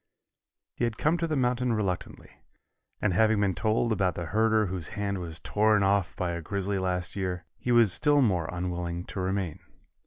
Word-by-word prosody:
He - - -4
had 115 -2 -3
come 160 +3 +1
to 165 - 0
the 155 - -1
mountain 125 -2 +1
reluctantly, 100 -5 -4 0.6
and 105 -3 +2
having 110 +3 +3
been 100 -2 +2
told 110 +4 0
about 95 -6 +1
the 85 - -4
herder 110 +3 +2
whose 90 -4 -4
hand 100 -1 -2
was 85 -2 -3
torn 105 -1 +2
off 95 -1 +1
by 90 -1 -2
a 85 0 -4
grizzly 100 +3 -2
last 90 -1 -1
year, 90 -3 -3
he 125 - -2
was 115 -5 +5
still 145 -2 +4
more 90 -8 +1
unwilling 85 -1 -3
to - - -6
remain. 95 -3 -2
100 Hz, 185 wpm, -28 LUFS, 90-110 Hz, 0.6 s, was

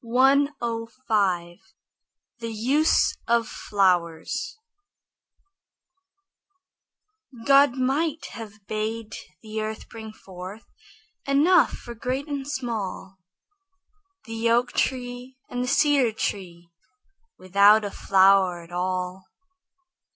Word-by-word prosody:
THE 230 -8 0 0.9
USE 260 +8 +2
OF 235 -1 +2
FLOWERS 195 - -1 2.9
God 280 -1 +6
might 290 +5 -1
have 215 -3 -10
bade 215 +1 -4 0.3
the 220 0 -4
earth 215 0 -5
bring 220 -1 -9
forth 190 +1 -11 0.6
Enough 305 +5 +4
for 240 - -8
great 255 +5 -3
and 280 -2 -4
small, 220 -8 -5 1.1
The 225 0 -2
oak 240 +1 +2
tree 250 0 -3
and 245 0 -2
the - - -3
cedar 280 -3 +3
tree, 175 -5 -5 0.7
Without 200 +3 +4
a 200 - -4
flower 190 -3 +3
at 170 - -17
all. 185 +1 -3
225 Hz, 85 wpm, -24 LUFS, 195-260 Hz, 2.9 s, God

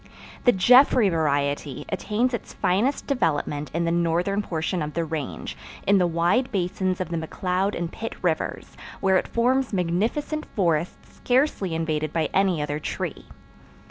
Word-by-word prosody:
The 245 - +7
Jeffrey 245 +1 +6
variety 145 -3 -1
attains 215 +6 0
its 235 - -5
finest 220 +10 +1
development 150 - -1
in 170 +1 -1
the 170 - +1
northern 175 +4 +1
portion 170 -2 -2
of 150 0 -4
the 170 -1 0
Range, 155 -3 -5 0.3
in 200 0 +4
the 180 - +3
wide 175 +10 +1
basins 185 -1 -1
of 185 -3 -3
the 170 - -2
McCloud 180 +4 -1
and 170 0 -3
Pitt 225 - -6
Rivers, 165 -3 -2 0.2
where 190 -1 +3
it - - -1
forms 255 +2 +1
magnificent 215 - -1
forests 170 -4 -1
scarcely 245 - +1
invaded 155 -2 -1
by 160 -2 0
any 185 -5 +2
other 150 0 -3
tree. - - -4
180 Hz, 150 wpm, -24 LUFS, 160-210 Hz, 0.3 s, The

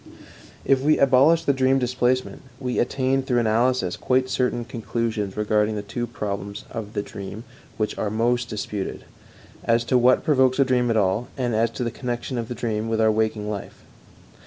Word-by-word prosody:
If 135 -1 +3
we 150 +2 +3
abolish 140 +5 +5
the 140 - +2
dream 130 0 +3
displacement, 125 0 0 0.2
we 125 -2 -2
attain 130 +2 +1
through 130 -2 0
analysis 115 -3 +1
quite 130 0 +1
certain 125 -2 0
conclusions 115 -4 -3
regarding 105 0 +1
two 120 +3 -4
problems 100 -3 -5
of 110 -2 -6
the 100 - -2
dream 100 +3 -8 0.3
which 110 -1 -1
are 105 - 0
most 120 +3 0
disputed 105 -2 -4 0.6
as 115 0 +2
to 125 +1 +2
what 125 +1 +4
provokes 130 -4 +3
a 135 - +4
dream 125 -2 +1
at 115 - +2
all, 100 +4 +1
and 125 -3 -1
as 115 +1 +2
to - - -1
the 115 - -2
connection 120 +1 -4
of 115 - -4
the 125 - -5
dream 110 -2 -2
with 110 0 0
our 110 0 +4
waking 110 -1 -1
life. 105 -2 -6
120 Hz, 180 wpm, -23 LUFS, 110-130 Hz, 0.6 s, abolish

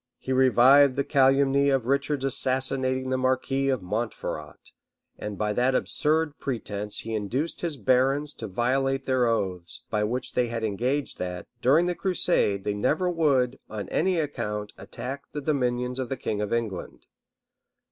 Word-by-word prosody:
He 130 - -3
revived 130 +1 +6
the 140 - +1
calumny 140 0 +3
of 135 -4 +1
Richard's 140 +1 0
assassinating 130 0 0
the 130 - +1
marquis 130 +1 +1
of 130 -7 0
Montferrat; 90 -7 -5 0.5
and 105 -1 -5
by 105 -1 0
that 125 +4 +2
absurd 155 +1 0
pretence 105 -5 -4
he 115 - -5
induced 120 +10 -2
his 165 -4 -2
barons 135 +5 +2
to 110 - -7
violate 135 +6 0
their 130 -2 +2
oaths, 95 -6 -2
by 105 -1 +1
which 120 +4 -3
they 125 - +1
had 115 -1 -4
engaged 125 +7 -1
that, 90 -1 -4 0.2
during 150 +7 +4
the 180 - 0
crusade, 175 - +1
they 105 - -1
never 155 - +1
would, 135 -6 +1
on 105 -3 -5
any 185 +2 +1
account, 110 -9 -3
attack 135 +3 -7
the 150 - -3
dominions 125 -3 -1
of 130 -2 -3
the 135 - -3
king 105 -1 -2
of 105 - -3
England. 105 - -3
130 Hz, 155 wpm, -26 LUFS, 110-140 Hz, 0.5 s, revived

